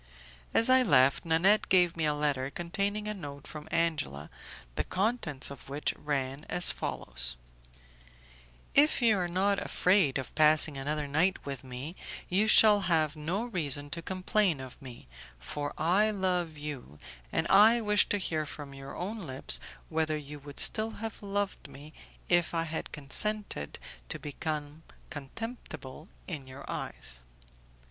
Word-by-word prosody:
As 230 - +5
I 260 0 +6
left, 140 - +3
Nanette 175 +6 +3
gave 180 -2 +4
me 160 -2 -1
a 150 -1 +1
letter 145 -3 -1
containing 200 +7 -3
a 210 - -2
note 145 -8 -9
from 150 0 -9
Angela, 150 - -2 0.4
the - - -2
contents 185 - -2
of 140 -1 -12
which 145 +2 -2
ran 140 -1 -3
as 180 0 +5
follows: 60 -1 +2 1.4
"If 295 +2 +4
you 225 -2 +4
are 180 - -1
not 195 +3 0
afraid 180 -8 +2
of 135 - -6
passing 155 -1 +5
another 145 +2 -3
night 165 +7 0
with 140 -1 -6
me 130 +6 -7 0.3
you 200 +4 +2
shall 215 -1 +6
have 155 -2 +1
no 170 +9 -3
reason 145 - -1
to 170 - -2
complain 185 -2 0
of 130 +1 -10
me, 125 - -11 0.3
for 145 - -5
I 190 +7 +2
love 180 -6 -2
you, 145 - -8 0.3
and 160 - -1
I 215 +4 +6
wish 210 -2 +2
to 205 - +1
hear 160 -5 -2
from 140 -1 -8
your 135 0 -10
own 205 +6 -5
lips 130 0 +6 0.3
whether 155 -1 -1
you 150 0 -9
would 145 0 -12
still 220 0 +7 0.2
have 225 - -7
loved 205 0 -3
me 150 +3 -12 0.3
if 175 -1 +1
I 165 - 0
had 160 0 -5
consented 150 - -1 0.3
to - - -3
become 150 0 -5 0.3
contemptible 150 - -8 0.2
in 150 -7 -7
your 130 +2 -11
eyes." - - -5
155 Hz, 150 wpm, -29 LUFS, 140-195 Hz, 1.4 s, still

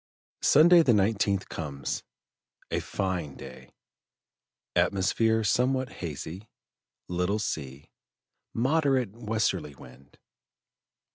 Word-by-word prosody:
Sunday 170 +4 +7
the 130 -7 +4
19th 100 -1 +1
comes; 70 -4 -4 0.7
a - - +1
fine 90 -7 -3
day, 65 -1 -11 1.1
atmosphere 110 +3 +2
somewhat 130 +4 +1
hazy, 85 +5 -7 0.6
little 90 +3 0
sea, 70 -9 -5 0.6
moderate 130 -2 +1
westerly 110 -9 -2
wind. 65 +1 -16
100 Hz, 80 wpm, -28 LUFS, 80-115 Hz, 1.1 s, Sunday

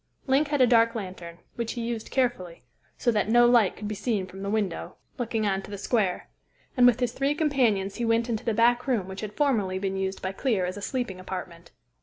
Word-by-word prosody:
Link 275 +3 +2
had 290 -2 0
a - - +8
dark 230 -1 +4
lantern, 185 -5 -7 0.2
which 235 -1 -3
he 240 - -4
used 230 -2 -4
carefully, 185 - -1 0.3
so 240 - +2
that 210 -2 0
no 240 +1 +6
light 235 -5 +4
could 210 - -6
be 215 - -3
seen 210 -1 -1
from 190 +1 -11
the 200 - -3
window 205 -5 -2 0.2
looking 225 -2 -1
on 195 -1 0
to - - -12
the 205 - -6
square; 200 -2 0 0.5
and 245 -1 +6
with 245 -1 +4
his 245 -2 0
three 275 +3 0
companions 240 -11 +1
he 240 - -2
went 230 +1 +2
into 230 -1 -2
the 225 -3 -1
back 240 +3 +3
room 225 -8 0
which 190 0 -7
had 210 -1 -7
formerly 220 -11 +1
been 195 0 -2
used 190 0 -2
by 190 - -3
Clear 200 -2 0
as 180 +1 -4
a 205 - -7
sleeping 240 -6 -3
apartment. 180 -2 -7
220 Hz, 230 wpm, -26 LUFS, 190-245 Hz, 0.5 s, a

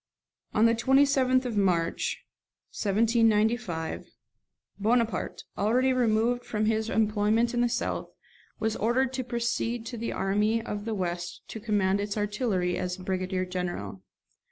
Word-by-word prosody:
On 215 - +5
the 230 - +5
27th 265 +1 +3
of 240 -3 -3
March 180 -5 0 0.5
1795 220 -4 +1 0.7
Bonaparte, 225 -1 0
already 250 +6 +2
removed 240 0 +2
from 215 -2 -1
his 220 0 0
employment 220 +2 +2
in 240 - +1
the 240 - +2
south, 235 - -2 0.5
was 220 0 0
ordered 250 +4 +1
to 260 0 -2
proceed 235 -1 -2
to 235 +1 -6
the 230 +1 -3
army 210 +4 +1
of 210 -2 -5
the 225 -1 -2
west 180 -1 -3
to 220 - -6
command 200 -3 +1
its 205 +1 -3
artillery 205 -4 0
as 180 0 -3
brigadier 185 0 -2
general. 175 - -4
220 Hz, 130 wpm, -28 LUFS, 195-235 Hz, 0.7 s, On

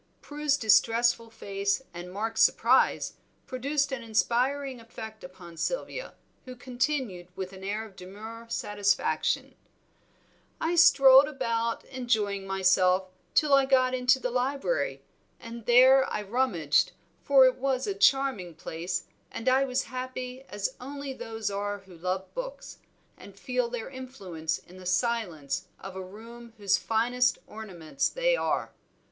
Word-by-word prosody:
Prue's 295 -1 -1
distressful 230 0 +3
face 200 +1 -2
and 175 +1 -8
Mark's 220 +3 -2
surprise - - +3 0.3
produced 280 +3 -1
an 265 -3 -3
inspiring 250 +4 0
effect 220 -1 -10
upon 180 -2 -12
Sylvia, - - -3 0.3
who 255 -1 -8
continued, 245 -7 -2
with 190 0 -5
an 190 0 -11
air 210 +3 -3
of 205 -3 -15
demure 220 +5 -10
satisfaction 205 -2 0 1.1
"I 325 +2 0
strolled 275 -5 +7
about, 230 -5 -2
enjoying 215 -7 -1
myself, 185 -1 +3 0.3
till 300 -2 +4
I 275 -1 +5
got 255 -1 +3
into 255 +1 +3
the 250 -1 -3
library, 275 - -1 0.4
and 230 -1 -9
there 260 +2 +6
I 210 - -2
rummaged, 195 - +1 0.3
for 270 -2 +6
it 255 0 +3
was 260 -1 0
a 405 - -1
charming 270 - +2
place, 175 +3 -4 0.3
and 230 - -7
I 260 +1 +4
was 255 -1 -1
happy 255 0 -6
as 205 -1 -3
only 280 +1 -6
those 225 -4 -4
are 205 +1 -2
who 190 -2 -16
love 185 +3 -3
books, - - -7 0.4
and 200 -1 -13
feel 250 +1 -1
their 235 -2 -5
influence 190 -12 -5
in 180 - -16
the 185 -1 -8
silence 185 - -1
of 190 0 -9
a 190 - -5
room 230 +5 -12
whose 200 -2 +2
finest 245 +3 +1
ornaments 210 - -3
they - - +1
are." - - -1
230 Hz, 140 wpm, -28 LUFS, 195-260 Hz, 1.1 s, strolled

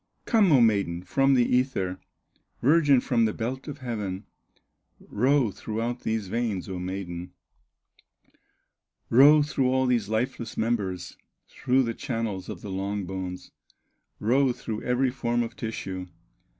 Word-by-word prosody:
Come, 215 -6 +4
O 135 - +6
maiden, 100 -6 +2
from 135 +8 +2
the 120 -2 +4
ether, 125 -9 0 0.6
Virgin 145 -2 +4
from 115 -3 +2
the 110 - -1
belt 130 +5 -4
of 145 -2 -6
heaven, 105 -5 -4 0.7
Row 130 +1 +1
throughout 115 +4 -4
these 110 -4 -2
veins, 110 -2 -2
O 95 -2 -5
maiden, 90 -1 -5 1.8
Row 145 +5 +7
through 135 -3 0
all 130 0 +2
these 120 -5 +1
lifeless 115 +1 -2
members, 100 -6 -2 0.3
Through 130 +1 +1
the 115 -1 -2
channels 115 -7 -4
of - - -7
the 100 - -7
long 100 +1 -3
bones, 90 -1 -6 0.7
Row 130 +5 +3
through 110 -2 -5
every 125 +1 +1
form 120 -2 0
of 115 -1 -7
tissue. 95 -4 -5
115 Hz, 135 wpm, -26 LUFS, 95-130 Hz, 1.8 s, Row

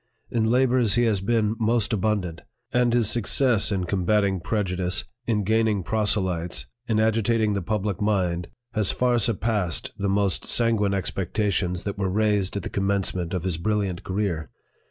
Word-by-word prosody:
In 115 -2 +1
labors 125 -3 +3
he 120 - +3
has 110 -5 +2
been 110 +1 +1
most 115 0 +1
abundant; 95 -5 -1 0.3
and 125 -1 +3
his 120 -2 +2
success 120 0 +2
in 95 -2 0
combating 100 +1 +1
prejudice, 90 -2 -1 0.2
in 105 -3 +1
gaining 110 -1 +1
proselytes, 95 -5 0 0.2
in 110 -3 +1
agi 110 +1 +2
tating 110 -1 +1
the 100 - -1
public 105 +2 -2
mind, 90 -5 0 0.3
has 105 -3 +1
far 125 -1 +2
surpassed 105 -5 -1
the 100 0 0
most 100 -2 +1
san 115 -1 +2
guine 100 -1 +1
expectations 95 -1 -1
that 100 -1 -4
were 95 -1 0
raised 105 -1 +1
at - - -4
the - - -3
commence 100 -1 0
ment 90 0 -3
of 90 - -3
his 90 -3 -1
brilliant 100 -1 -1
career. 95 -7 -2
105 Hz, 165 wpm, -25 LUFS, 95-110 Hz, 0.3 s, labors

